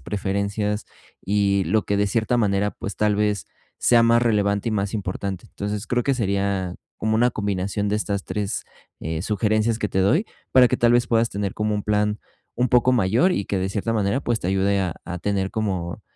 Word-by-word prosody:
preferencias 100 +1 -2 0.4
y 100 -1 +2
lo 110 -1 +2
que 100 - 0
de 100 0 +2
cierta 115 +3 +1
manera, 100 -2 +1
pues, 100 - -6
tal 105 -1 +2
vez, 105 -2 0 0.3
sea 120 -1 +5
más 115 +1 +4
relevante 105 -2 +1
y - - -2
más 100 +1 -1
importante. 95 -1 -4
Entonces 105 +1 -4
creo 125 0 0
que 140 - +2
sería 100 -4 -1 0.2
como 110 0 0
una 120 +2 +3
combinación 100 -1 -2
de 105 - +1
estas 100 -2 -2
3, 105 -2 -3 0.4
eh, 80 +1 -3
sugerencias 110 +2 +1
que 105 - -1
te 95 - 0
doy 155 - +2 0.3
para 125 -2 +7
que - - +1
tal 120 0 +4
vez, 120 0 +3
puedas 115 0 +2
tener 100 -1 -3
como 105 0 -1
un 105 - -2
plan 105 0 0 0.4
un 125 0 +1
poco 125 +1 +4
mayor 120 - +3
y 100 - -2
que 100 - -1
de 95 +1 -1
cierta 110 +3 -2
manera, 110 +4 +1
pues, 120 -3 0
te - - -4
ayude 100 +1 +2
a 90 -3 -2
a 90 0 -5
tener 95 0 -1
como 95 -6 -3
105 Hz, 205 wpm, -23 LUFS, 100-110 Hz, 0.4 s, para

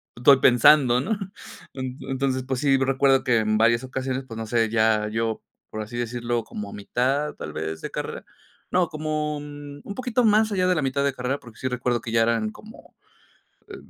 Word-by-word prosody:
estoy 130 +3 +6
pensando, 125 0 +5
¿no?, 215 +8 -1 0.6
entonces, 130 0 -3
pues 130 -2 -1
sí, 135 -2 +4
recuerdo 135 0 +3
que 120 -2 +3
en 110 0 +1
varias 115 +2 +3
ocasiones, 130 0 -3
pues, 115 -2 -8
no 110 - -4
sé, 115 0 +1
ya 110 -1 +2
yo, 110 0 -2 0.3
por 110 - -4
así 115 +3 -7
decirlo, 120 0 -2
como 105 -1 -7
mitad 135 +8 -1
tal - - -7
vez 80 0 -4
de - - -6
carrera, - - -5 0.5
no, 180 -2 +3
como 155 -1 -2
un 145 0 -9
poquito 250 -1 0
más 215 0 +4
allá 185 -2 +1
de 180 - +3
la 155 - 0
mitad 135 +1 0
de 140 - +1
carrera, 130 +2 -2
porque 115 -3 -15
sí 130 - -2
recuerdo 125 -1 -1
que 115 - -6
ya 115 0 +3
eran 115 -2 +1
como, 215 - -15 0.7
eh, - - -8
130 Hz, 190 wpm, -24 LUFS, 115-145 Hz, 0.7 s, estoy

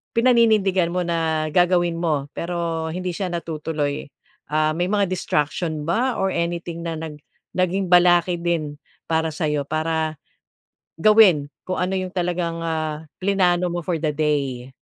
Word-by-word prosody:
pinaninindigan 220 -7 +3
mo 180 - 0
na 160 -2 0
gagawin 175 -1 +3
mo 150 -5 -1
pero 170 -1 -2
hindi 180 +1 -3
siya 185 +1 -3
natutuloy? 155 -4 -3 0.4
Ah, 155 +1 +2
may 175 - +1
mga 205 -2 +2
distraction 155 -2 -1
ba 240 +8 +1
or 195 - +1
anything 170 0 -3
na 165 - -2
nag 155 -2 -7 0.4
naging 185 +1 +1
balakid 175 0 +5
din 155 -4 -1 0.3
para 160 0 +1
sa'yo 150 -2 -1
para 155 0 -1 0.8
gawin 210 -8 +6 0.2
kung 185 - -2
ano 180 +1 0
'yong 185 0 -3
talagang, 175 -2 -1
ah, 155 -1 -3 0.2
plinano 180 -2 +2
mo 175 0 -2
for 175 -2 0
the 155 - +1
day? 140 -4 -1
170 Hz, 140 wpm, -22 LUFS, 155-180 Hz, 0.8 s, gawin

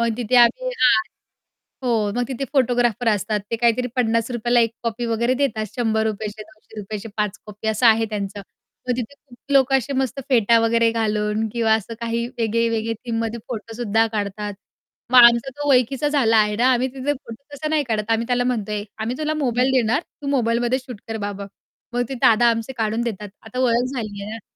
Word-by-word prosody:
मग 235 - +2
तिथे 245 0 0
आम्ही 245 - +4
हां, 255 - +3 0.8
हो, 225 -5 +1
मग 245 - +1
तिथे 265 +1 -3
फोटोग्राफर 245 -3 +2
असतात, 210 0 0
ते 230 - 0
काहीतरी 235 +2 +2
₹50 235 0 0
ला 240 - +6
1 230 -1 +2
कॉपी 235 0 -2
वगैरे 235 +2 +1
देतात, 235 -5 -1
₹100 220 -2 0
चे 215 +1 -9
₹200 215 -1 -9
चे 225 - -8
5 210 -1 -1
कॉपी 210 +1 -6
असं 220 +3 +2
आहे 225 0 +5
त्यांचं. 200 -1 -4 0.5
मग 250 - +1
तिथे 245 +2 -5
खूप 270 -4 -20
लोकं 270 -1 +5
असे 260 +3 -5
मस्त 265 0 -1
फेटा 230 -3 +4
वगैरे 230 0 +3
घालून 215 -1 0
किंवा 230 -2 +2
असं 220 +1 -3
काही 235 0 -2
वेगळे-वेगळे 230 0 0
थीममध्ये 230 0 -3
फोटो 225 -1 -6
सुद्धा 225 -1 +2
काढतात. 205 0 -3 0.6
मग 255 - +8
आमचा 235 +2 +5
तो 290 0 -2
ओळखीचा 265 +3 +2
झाला 260 -7 +3
आहे 210 -1 +3
ना, 250 +3 +4
आम्ही 255 +1 +1
तिथे 270 +2 -1
फोटो 255 -3 -10
तसा 305 +2 -4
नाही 305 -1 +1
काढत, 215 -1 -2
आम्ही 230 +1 0
त्याला 245 0 +1
म्हणतोय, 210 -4 -2
"आम्ही 230 +3 -3
तुला 310 0 -1
मोबाईल 255 -3 +1
देणार, 250 +2 +2 0.2
तू - - -6
मोबाईलमध्ये 240 +1 +1
शूट 250 -5 -10
कर 225 - -3
बाबा." 200 -1 -6 0.5
मग 245 - +1
ते 270 - -4
दादा 230 +1 +5
आमचे 230 +2 -3
काढून 220 +1 0
देतात. 210 -3 -4
आता 225 +3 -8
ओळख 245 -1 +2
झाली 215 -5 -5
आहे 205 - -6
ना. 225 - -9
230 Hz, 195 wpm, -22 LUFS, 220-250 Hz, 0.8 s, मग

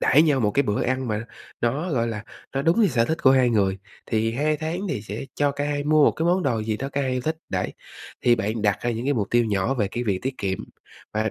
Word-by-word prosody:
đãi 150 +4 +5
nhau 145 -5 +3
một 105 -3 +2
cái 140 +7 +2
bữa 105 -5 0
ăn 130 0 -1
mà 110 +1 -2 0.4
nó, 140 +10 0
gọi 115 -4 +1
là, 110 -1 -5 0.3
nó 135 - 0
đúng 165 +9 +3
như 215 - +6
sở 120 -6 +2
thích 160 +6 -2
của 130 - +7
hai 130 -2 +4
người. 100 -4 +1 0.3
Thì 115 0 0
2 150 +5 +1
tháng 160 +4 -3
thì 130 -10 -2
sẽ 105 +4 -6
cho 145 -1 +2
cả 145 +1 -3
hai 145 0 -1
mua 155 0 +5
một - - +5
cái 160 - -2
món 180 +2 +3
đồ 115 -6 0
gì 110 0 -1
đó 135 +5 -4
cả 140 0 -2
hai 130 -1 -1
yêu 125 - 0
thích, 160 +5 -2
đấy. - - -2 0.5
Thì 120 -1 +5
bạn 110 0 -2
đặt 105 -2 +2
ra 120 - 0
những 115 +1 -3
cái 145 - +3
mục 105 -5 -1
tiêu 120 0 +4
nhỏ 105 +4 0
về 105 -6 0
cái 120 +4 -3
việc 100 -4 0
tiết 130 0 -3
kiệm, 95 -2 -1 0.5
và 110 0 0
125 Hz, 280 wpm, -24 LUFS, 110-145 Hz, 0.5 s, của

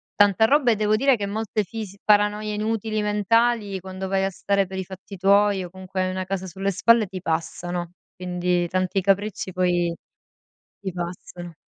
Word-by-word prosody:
tanta 205 +1 +5
roba 270 -1 +4
e - - +3
devo 215 0 +2
dire 265 +1 +3
che 205 - -2
molte 215 +1 -2
fis 205 -1 -7
paranoie 210 0 +2
inutili 215 0 -1
mentali 210 0 +1
quando 190 0 -6
vai 195 0 +1
a 195 - 0
stare 195 +1 0
per 190 0 -7
i 190 - -3
fatti 195 +1 -10
tuoi 200 +1 +3
o - - -9
comunque 190 +1 -5
hai 185 - -1
una 185 0 -3
casa 190 0 -3
sulle 195 +3 -2
spalle 230 +2 +4
ti 185 -1 -7
passano. 175 +1 -3 0.2
Quindi 180 -1 -1
tanti 185 +1 0
capricci 195 0 0
poi 175 -2 +1 0.9
ti 195 -2 -4
passano. 175 -1 -7
195 Hz, 175 wpm, -24 LUFS, 185-210 Hz, 0.9 s, tanta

